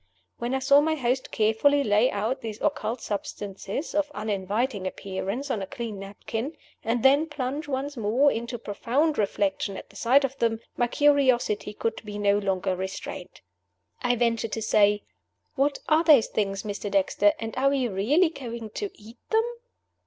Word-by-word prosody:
When 240 +2 -1
I - - +2
saw 280 +2 +5
my 315 +1 +1
host 260 -2 -1
carefully 225 +7 +3
lay 215 +3 +3
out 220 +6 -2
these 220 -2 -6
occult 235 -5 -1
substances 200 - -5
of 295 0 +1
uninviting 205 +1 -1
appearance 195 +9 -4
on 215 - -1
a 190 - -4
clean 225 -2 -5
napkin, 225 +8 -5 0.3
and 230 +1 0
then 280 +4 +5
plunge 295 0 -4
once 280 +1 -3
more 240 +5 +3
into 235 +2 -4
profound 250 +8 0
reflection 200 -1 0
at - - -10
the - - -22
sight 265 +4 +4
of 270 0 -1
them, 225 -1 +1 0.2
my 240 - +1
curiosity 260 -7 +2
could 225 +1 -3
be 210 -1 -6
no 205 0 +3
longer 190 -2 0
restrained. 190 +1 -6 0.6
I 245 -2 +2
ventured 230 -2 0
to 225 - -2
say, 210 -1 +3 0.5
"What 280 0 +1
are 315 +1 +4
those 295 -9 +7
things, 195 -2 -1
Mr. 205 -1 -4
Dexter, 200 +1 +3
and 225 +1 -5
are 270 +2 +3
we 270 -3 +1
really 245 - +2
going 235 -7 -7
to 410 - -4
eat 225 +3 -14
them?" 445 +1 +3
230 Hz, 165 wpm, -26 LUFS, 205-275 Hz, 0.6 s, those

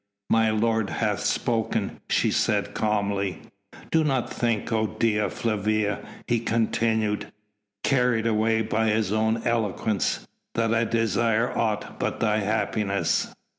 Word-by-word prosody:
"My 115 -1 +4
lord 110 -1 +1
hath 105 -3 -1
spoken," 110 0 -1
she - - +2
said - - +1
calmly. 100 -4 -1 0.5
"Do 160 -1 +4
not 135 -5 0
think, 115 -3 -1
O 110 -1 +2
Dea 105 -2 0
Flavia," 110 -1 0 0.3
he 120 -1 +2
continued, 110 -2 0 0.5
carried 125 -4 +2
away 110 0 +2
by 110 +1 0
his 105 -2 +1
own 110 +1 +1
eloquence, 110 -3 0 0.3
"that 115 0 +1
I 115 0 +2
desire 115 +1 +1
aught 110 -2 -2
but - - -2
thy 110 -1 +2
happiness. 105 -1 0
110 Hz, 125 wpm, -25 LUFS, 105-115 Hz, 0.5 s, My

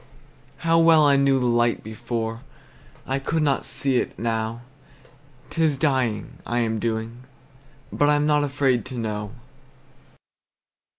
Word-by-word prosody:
How 165 0 +4
well 165 -2 +6
I 140 -1 +5
knew 140 -1 +3
the 125 - -1
light 120 -1 +1
before! 115 +1 -4 0.6
I 135 +1 -1
could 155 +3 -1
not 140 -3 0
see 135 -2 0
it - - -2
now. 115 0 -2 0.9
'T 165 - 0
is 150 -3 +2
dying, 130 -7 -1
I 120 - -3
am 110 -1 -1
doing; 115 +2 -4 0.7
but 145 - +2
I'm 150 0 +3
not 150 -1 +3
afraid 135 -4 +1
to 130 - -7
know. 105 -2 -4
125 Hz, 135 wpm, -23 LUFS, 115-145 Hz, 0.9 s, well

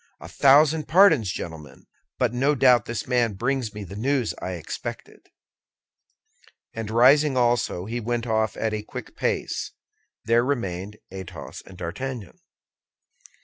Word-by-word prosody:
"A - - -10
thousand 150 +3 +4
pardons, 160 - +5
gentlemen; 80 -4 -8 0.3
but 120 -2 +1
no 140 +4 +2
doubt 125 -4 +5
this 115 -1 -4
man 120 -4 +1
brings 125 +1 -1
me 105 0 -7
the 95 +1 -9
news 125 +1 0
I 95 - -4
expected." 85 -3 -8 1.4
And 110 -2 -5
rising 135 +5 +5
also, 120 -7 +1
he 115 +3 -3
went 120 +1 -2
off 110 -1 0
at 110 -1 -1
a 105 - -2
quick 105 - -9
pace. - - -2 0.5
There 115 +2 +3
remained 105 -6 -3
Athos 95 -2 -8
and 95 - -13
D'Artagnan. 110 +5 -6
115 Hz, 135 wpm, -24 LUFS, 105-130 Hz, 1.4 s, pardons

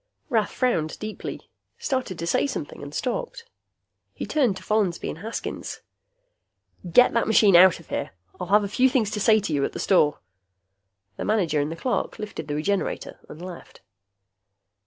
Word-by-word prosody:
Rath 220 -5 +1
frowned 170 -12 0
deeply, 215 0 -7 0.3
started 255 - -2
to 170 - -4
say 170 - +2
something, 270 - -6
and - - -8
stopped. - - -3 0.7
He - - -4
turned 250 -11 +1
to - - -11
Follansby 205 -5 0
and 160 - -6
Haskins. 225 +5 -5 1.1
"Get 250 +8 +6
that 230 - +1
machine 210 -3 +5
out 180 0 +7
of 170 - -17
here. - - -2 0.3
I'll 180 - -4
have 205 +3 +4
a - - -1
few 255 +6 +3
things 240 -6 +1
to 210 - -2
say 220 +1 +5
to 195 -6 -3
you 140 -1 +1
at - - -2
the - - -6
store." 150 -6 +3 1.0
The - - -4
manager 180 -8 +1
and 145 +2 -2
the - - -4
clerk 245 +9 -2
lifted 210 -1 -6
the 145 - -2
Regenerator 195 +6 -2
and 160 - -10
left. 180 -2 -11
205 Hz, 175 wpm, -25 LUFS, 170-230 Hz, 1.1 s, out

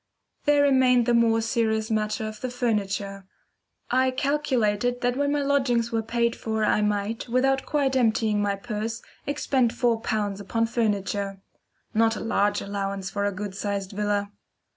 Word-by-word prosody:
There 290 -1 +4
remained 260 -3 +4
the 240 - +2
more 230 -1 +4
serious 220 -1 0
matter 215 +1 -1
of 215 -1 -8
the 255 - -2
furniture. 200 -5 -2 0.6
I 260 +1 +3
calculated 250 -4 0
that 245 0 +1
when 285 +1 +1
my 290 -1 +1
lodgings 255 -4 +1
were 225 -1 +1
paid 235 +1 0
for 220 -1 -1
I 210 - +2
might, 210 +3 -1
without 270 +2 +1
quite 280 -3 +1
emptying 220 -4 +2
my 200 -1 +1
purse, 220 +1 -4 0.2
expend 265 -4 +1
four 235 -2 +1
pounds 205 -3 -1
upon 230 +3 0
furniture 200 -3 -1 0.5
not 225 +1 +3
a - - -5
large 205 -2 +1
allowance 195 -1 -3
for 200 0 -1
a 205 - +1
good 200 0 -5
sized 200 -1 -3
villa. 205 0 -1
225 Hz, 160 wpm, -25 LUFS, 205-245 Hz, 0.6 s, There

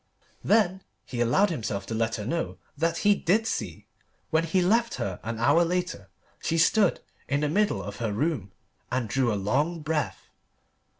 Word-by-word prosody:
Then 190 -3 +3 0.2
he 120 -2 -4
allowed 180 - +3
himself 105 -9 -3
to 115 - -5
let 115 0 0
her 105 - -5
know 165 +7 -2 0.2
that 165 +3 0
he 205 - +7
did 200 +4 +1
see. - - -3 0.5
When 160 +1 +2
he 165 +3 +1
left 225 +6 +2
her 95 -2 -3
an 115 0 -4
hour 145 +9 +4
later 175 - -2 0.3
she 165 - 0
stood 185 +4 +3 0.3
in 140 +1 0
the 150 - +1
middle 210 +6 +1
of 100 0 -7
her 115 -3 -2
room 115 - -1 0.4
and 130 -3 0
drew 125 +1 +1
a - - 0
long 145 - 0
breath. 155 -1 -2
155 Hz, 175 wpm, -27 LUFS, 115-180 Hz, 0.5 s, he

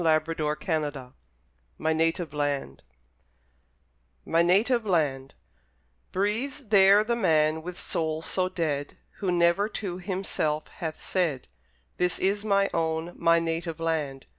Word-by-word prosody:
Major 155 -1 +4
Richardson 150 -4 -2 0.6
MY 160 - 0
NATIVE 165 0 0 2.5
LAND 145 -9 0 0.8
Breathes 225 +8 -2
there 200 0 +6
the 235 +2 0
man, 160 -7 +2
with 180 +2 -7
soul 160 -1 -2
so 185 +1 0
dead, 155 -6 -2 0.2
Who 190 -3 -1
never 175 +4 +3
to 190 -4 -4
himself 180 -5 -2
hath 160 -2 -6
said, 165 - -1 0.5
This 180 0 +1
is 200 +2 0
my 200 -2 +2
own, 165 +1 -1
my 165 0 +4
native 165 0 -2
land! 150 -5 -2
165 Hz, 110 wpm, -27 LUFS, 155-190 Hz, 2.5 s, there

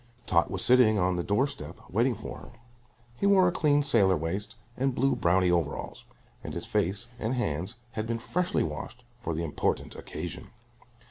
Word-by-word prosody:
Tot 85 -2 +3
was 95 -1 -2
sitting 120 -4 +6
on 90 -1 +2
the 85 - -1
door 105 +9 +2
step 140 - -8
waiting 120 +6 +1
for 110 - -7
her. - - -13 0.7
He 200 - +1
wore 190 -2 +6
a - - +3
clean 145 -5 +3
sailor 100 -9 +4
waist 95 +8 -3 0.2
and 135 0 0
blue 135 +1 +2
brownie 90 +1 +3
overalls, 85 -5 -2 0.4
and - - -6
his - - -4
face 100 +6 0
and 115 +4 -1
hands 95 -1 -2 0.2
had 110 -1 -3
been 115 0 -1
freshly 180 +10 0
washed 80 +11 -6 0.2
for 85 -8 -2
the 85 - -2
important 80 - -1
occasion. - - -7
110 Hz, 180 wpm, -28 LUFS, 90-130 Hz, 0.7 s, sitting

